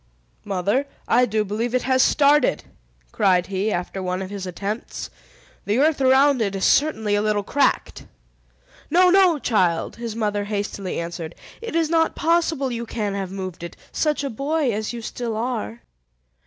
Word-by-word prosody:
"Mother, 200 +8 0 0.2
I 250 0 +4
do 215 0 0
believe 225 +5 -2
it 255 - +1
has 260 0 +3
started!" 295 +2 +3 0.5
cried 185 -2 +2
he, 195 +2 -1
after 180 +1 -3
one 185 +1 -2
of 190 - -8
his 195 -2 -5
attempts. 200 +5 -5 0.5
"The 205 +3 +1
earth 295 +1 +2
around 265 0 +4
it 200 -2 -1
is 195 - 0
certainly 220 -9 +2
a 205 - +2
little 210 -1 0
cracked!" 280 +7 0 0.8
"No, 360 +1 +5
no, 370 -4 +5
child!" 185 - 0
his 230 -2 -5
mother 210 -2 -1
hastily 200 -2 -3
answered. 170 -1 -6 0.3
"It 460 -6 -6
is 330 -1 +1
not 325 -1 +2
possible 325 -5 +1
you 235 -1 -4
can 210 -3 -3
have 195 -2 -3
moved 185 -3 -6
it, 170 -1 -8
such 300 -2 0
a 275 - -3
boy 280 +3 0
as 215 0 -3
you 235 -1 -7
still 230 -1 -4
are!" 170 - -3
220 Hz, 170 wpm, -22 LUFS, 195-275 Hz, 0.8 s, No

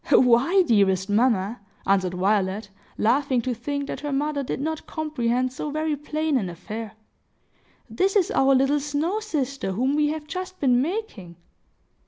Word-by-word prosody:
"Why, 260 +10 +5
dearest 200 - +2
mamma," 220 -1 +2 0.3
answered 190 -2 +1
Violet, 195 +1 0 0.3
laughing 260 +3 +2
to 255 - -1
think 280 +4 -3
that - - -5
her 295 -1 -4
mother 285 +1 -1
did 260 - -4
not 315 +2 -3
comprehend 255 -5 -1
so 295 - -4
very 310 +1 -1
plain 300 0 -1
an 190 -5 -3
affair, 215 +5 -7 0.9
"this 375 - 0
is 385 -4 +3
our 270 0 +4
little 270 +3 +3
snow 295 +8 -1
sister 275 - -3
whom 255 +7 0
we 300 0 +3
have 305 0 -3
just 370 +3 -6
been 250 -3 +3
making!" 285 - -4
270 Hz, 155 wpm, -24 LUFS, 220-300 Hz, 0.9 s, Why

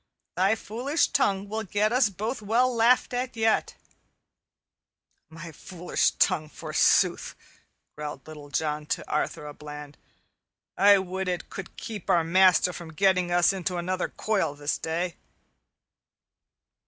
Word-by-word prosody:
"Thy 195 +4 +3
foolish 250 +9 -1
tongue 200 -8 +1
will 220 +2 -3
get 210 +2 0
us 250 -3 +4
both 215 +5 -4
well 240 +4 +1
laughed 235 +2 +3
at 250 0 -3
yet." 225 0 +1 1.5
"My 165 +1 -10
foolish 175 +3 -1
tongue, 155 -4 +1
forsooth," - - +1 0.6
growled 150 0 -7
Little 150 -2 -10
John 150 +1 -2
to - - -3
Arthur 150 0 -2
a 150 - -7
Bland. 150 -1 -10 0.8
"I 200 +1 +6
would 190 0 -3
it 180 -2 -3
could 190 -3 -8
keep 215 -5 -7
our 170 - +4
master 180 +1 +4
from 165 -2 -9
getting 185 0 +2
us 175 +2 +4
into 185 -1 -3
another 185 +1 -2
coil 200 -9 -1
this 145 0 -2
day." 170 +2 -3
185 Hz, 130 wpm, -26 LUFS, 160-215 Hz, 1.5 s, I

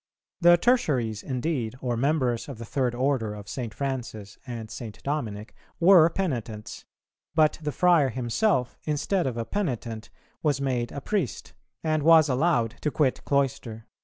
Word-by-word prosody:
The 175 0 +7
Tertiaries 135 - +1
indeed, 130 -3 -2
or 125 -2 -2
members 130 -1 0
of 135 - -7
the 115 - -7
third 125 +1 -1
order 125 -5 0
of 105 -1 -10
St. 120 -2 -5
Francis 120 -7 -5
and 115 -3 -6
St. 110 -2 -7
Dominic, 110 -8 -3 0.3
were 170 -2 +7
penitents; 120 - -4 0.5
but 155 -1 +3
the 150 -1 -2
friar 170 -3 +4
himself, 125 - 0
instead 155 +4 0
of 120 -3 -3
a 115 - -2
penitent, 120 - -3 0.3
was 145 -3 +1
made 125 -3 -1
a 140 - -6
priest, 180 - -3 0.3
and 155 -1 +1
was 160 0 +6
allowed 125 -4 +1
to 150 - 0
quit 140 -3 0
cloister. 130 -5 -1
130 Hz, 150 wpm, -26 LUFS, 115-155 Hz, 0.5 s, The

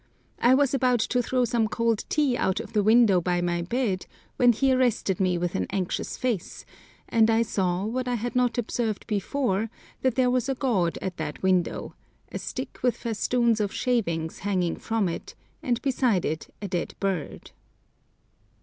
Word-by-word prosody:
I 250 +2 +5
was 280 -1 +2
about 255 -2 +2
to 245 +2 +1
throw 250 +1 +1
some 235 -2 +1
cold 230 0 0
tea 290 -5 +2
out 190 -4 0
of 225 0 -8
the 210 - +3
window 215 -3 +5
by 175 0 0
my 175 0 0
bed 195 0 -1 0.3
when 245 -1 +6
he 265 +3 +2
arrested 240 -7 +1
me 185 -2 +2
with 175 0 -2
an - - -1
anxious 185 -2 -2
face, 235 -9 -3 0.4
and 225 -1 +3
I 225 +1 +4
saw, 185 -3 -1
what 250 +3 -2
I 245 - 0
had 240 +2 -4
not 250 -1 +2
observed 230 -2 -2
before, 220 0 -1 0.3
that 260 -3 +1
there 250 -1 +3
was 250 +1 0
a 270 - 0
god 205 -11 0
at 185 -2 -4
that 155 +1 -5
window—a 185 -2 -2
stick - - -6
with 245 -2 +1
festoons 235 0 +1
of 205 -2 0
shavings 170 -10 -1
hanging 185 -4 -1
from 225 -3 -1
it, 170 - -6 0.3
and 240 -2 0
beside 250 - +1
it 155 +1 -3
a - - -2
dead 175 -2 -3
bird. 190 -6 -3
225 Hz, 175 wpm, -26 LUFS, 185-245 Hz, 0.4 s, when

